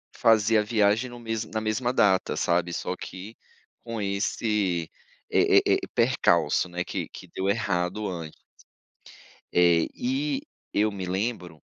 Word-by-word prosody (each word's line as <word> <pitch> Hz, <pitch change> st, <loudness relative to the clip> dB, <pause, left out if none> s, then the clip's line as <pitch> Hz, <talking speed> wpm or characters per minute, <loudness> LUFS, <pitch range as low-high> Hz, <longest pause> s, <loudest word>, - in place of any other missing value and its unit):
fazer 110 Hz, -2 st, +4 dB
a -, -, +1 dB
viagem 110 Hz, +3 st, +2 dB
no 120 Hz, -, -10 dB
mesmo 115 Hz, -1 st, -4 dB
na 110 Hz, -, -1 dB
mesma 115 Hz, +3 st, -1 dB
data, 100 Hz, -6 st, +3 dB
sabe, 85 Hz, 0 st, +1 dB
só 90 Hz, -, -3 dB
que 100 Hz, +5 st, -9 dB, 0.5 s
com 115 Hz, -2 st, -5 dB
esse, 100 Hz, -3 st, -1 dB, 0.4 s
eh -, -, +4 dB
eh -, -, +7 dB, 0.2 s
eh, -, -, -4 dB
percalço, -, -, +2 dB
né, 90 Hz, +1 st, -3 dB
que -, -, -4 dB
que -, -, -11 dB
deu 95 Hz, -, -1 dB
errado 100 Hz, -1 st, -1 dB
ant 85 Hz, -3 st, -6 dB, 1.2 s
Eh, 85 Hz, -2 st, +4 dB
e 270 Hz, +3 st, -1 dB, 0.3 s
eu 105 Hz, +1 st, +2 dB
me 95 Hz, -2 st, -5 dB
lembro 90 Hz, -3 st, -3 dB
105 Hz, 145 wpm, -26 LUFS, 90-115 Hz, 1.2 s, eh